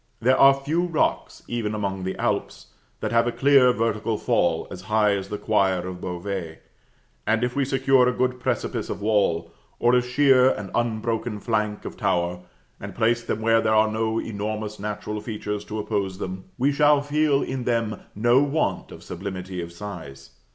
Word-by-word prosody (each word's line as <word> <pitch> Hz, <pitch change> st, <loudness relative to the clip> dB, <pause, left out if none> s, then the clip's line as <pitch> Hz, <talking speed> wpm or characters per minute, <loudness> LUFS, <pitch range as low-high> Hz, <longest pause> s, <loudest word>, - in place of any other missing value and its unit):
There 130 Hz, +3 st, +3 dB
are 135 Hz, 0 st, +8 dB
few 145 Hz, +5 st, -1 dB
rocks, 165 Hz, -3 st, -1 dB
even 110 Hz, -3 st, -2 dB
among 95 Hz, -3 st, -3 dB
the 95 Hz, -, -2 dB
Alps, -, -, -3 dB, 0.3 s
that -, -, -2 dB
have 115 Hz, 0 st, +3 dB
a -, -, +1 dB
clear 135 Hz, 0 st, +5 dB
vertical 115 Hz, -1 st, -1 dB
fall 85 Hz, -10 st, +1 dB
as 90 Hz, -, -7 dB
high 105 Hz, -1 st, +3 dB
as 95 Hz, 0 st, -5 dB
the 105 Hz, -, -3 dB
choir 95 Hz, -4 st, +1 dB
of 90 Hz, -1 st, -7 dB
Beauvais; 90 Hz, -2 st, -4 dB, 0.7 s
and 110 Hz, +1 st, +2 dB
if 125 Hz, 0 st, -1 dB
we 140 Hz, -, +2 dB
secure 135 Hz, -1 st, +3 dB
a -, -, +1 dB
good 125 Hz, 0 st, -1 dB
precipice -, -, -2 dB
of -, -, -4 dB
wall, 90 Hz, -6 st, +1 dB, 0.2 s
or 120 Hz, +1 st, +3 dB
a 125 Hz, -, +5 dB
sheer 130 Hz, 0 st, +4 dB
and 105 Hz, -6 st, -4 dB
unbroken 115 Hz, -1 st, -1 dB
flank 105 Hz, -1 st, -2 dB
of -, -, -7 dB
tower, 85 Hz, 0 st, 0 dB, 0.4 s
and -, -, -8 dB
place 120 Hz, +1 st, +2 dB
them 110 Hz, -, -3 dB
where 115 Hz, 0 st, +4 dB
there 110 Hz, -1 st, +2 dB
are 110 Hz, 0 st, +4 dB
no 110 Hz, 0 st, -1 dB
enormous 105 Hz, 0 st, -4 dB
natural 105 Hz, +1 st, -4 dB
features 105 Hz, -1 st, -4 dB
to 110 Hz, -, -5 dB
oppose 100 Hz, -3 st, -2 dB
them, 95 Hz, -1 st, -6 dB
we 135 Hz, +3 st, +2 dB
shall 145 Hz, 0 st, +4 dB
feel 145 Hz, -1 st, +2 dB
in 130 Hz, -2 st, -4 dB
them 115 Hz, -3 st, 0 dB, 0.2 s
no 120 Hz, +5 st, +4 dB
want 145 Hz, +2 st, -1 dB
of -, -, -11 dB
sublimity 95 Hz, 0 st, -6 dB
of 85 Hz, 0 st, -7 dB
size. 85 Hz, -8 st, -9 dB
110 Hz, 180 wpm, -24 LUFS, 100-125 Hz, 0.7 s, are